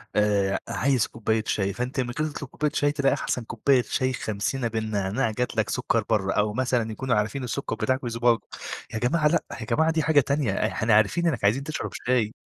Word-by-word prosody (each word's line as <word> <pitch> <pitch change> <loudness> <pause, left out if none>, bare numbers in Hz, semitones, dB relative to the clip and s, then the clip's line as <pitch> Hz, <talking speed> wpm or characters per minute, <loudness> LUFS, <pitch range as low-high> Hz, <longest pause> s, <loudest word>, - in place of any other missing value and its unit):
آآ، 100 -2 +2
عايز 130 -4 +1
كوباية 110 0 -1
شاي 100 -1 0
فأنت 125 +3 -3
من 120 - -3
غير 155 - +1
ما 150 - -7
تطلب 140 - -7
كوباية 150 -1 -1
شاي 145 0 +2
تلاقي 140 -2 +2
أحسن 130 -3 -2
كبواية 125 +3 +2
شاي 130 +4 -1
خمسينة 115 +4 -2
بالنعناع 110 +1 -1
جات 125 +2 -2
لك 110 0 +1
سكر 115 -3 0
برّه، 100 -3 +1
أو 105 0 +1
مثلًا 125 -3 0
يكونوا 130 +3 -1
عارفين 110 +6 -1
السكر 125 +3 -3
بتاعك 130 0 -1
ويضب 115 0 +2 0.5
يا 110 - -2
جماعة 150 +5 +2
لأ، 165 +1 +2 0.2
يا - - -4
جماعة 160 +9 +2
دي 160 -1 0
حاجة 155 -2 +5
تانية، 140 -3 0
إحنا 110 +2 +1
عارفين 110 +12 +3
إنك 130 -10 -1
عايزين 120 +7 +3
تشرب 155 +1 -4 0.2
شاي. 120 -4 +2
120 Hz, 200 wpm, -25 LUFS, 110-140 Hz, 0.5 s, حاجة